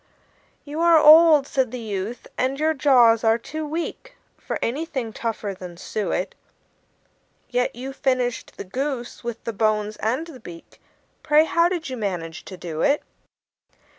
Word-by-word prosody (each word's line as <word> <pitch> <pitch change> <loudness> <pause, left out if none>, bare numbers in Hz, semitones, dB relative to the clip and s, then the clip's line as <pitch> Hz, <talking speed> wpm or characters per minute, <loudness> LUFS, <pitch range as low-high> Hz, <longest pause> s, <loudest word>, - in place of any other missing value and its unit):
"You 295 +2 -6
are 335 -1 +6
old," 310 -1 +8
said 265 -3 0
the 250 - -6
youth, 215 0 -5
"and 265 +2 -1
your 315 +1 +2
jaws 245 -6 +4
are 225 0 +4
too 310 +6 -6
weak 340 +10 -5 0.2
For - - -5
anything 260 -3 -3
tougher 220 -4 -3
than 180 -2 -10
suet; 185 -1 -3 1.2
Yet 245 -1 0
you 260 +3 -6
finished 255 -3 -1
the - - -5
goose, 250 +5 -4
with 235 -1 -5
the 230 - -4
bones 215 0 0
and 250 +9 -1
the 315 -6 -12
beak. 175 -6 -13 0.4
Pray, 305 0 +4
how 335 +1 +3
did 345 -3 -3
you 255 - -4
manage 175 -6 -4
to 185 - -9
do 165 -3 -5
it?" 285 +1 +2
250 Hz, 155 wpm, -23 LUFS, 215-300 Hz, 1.2 s, old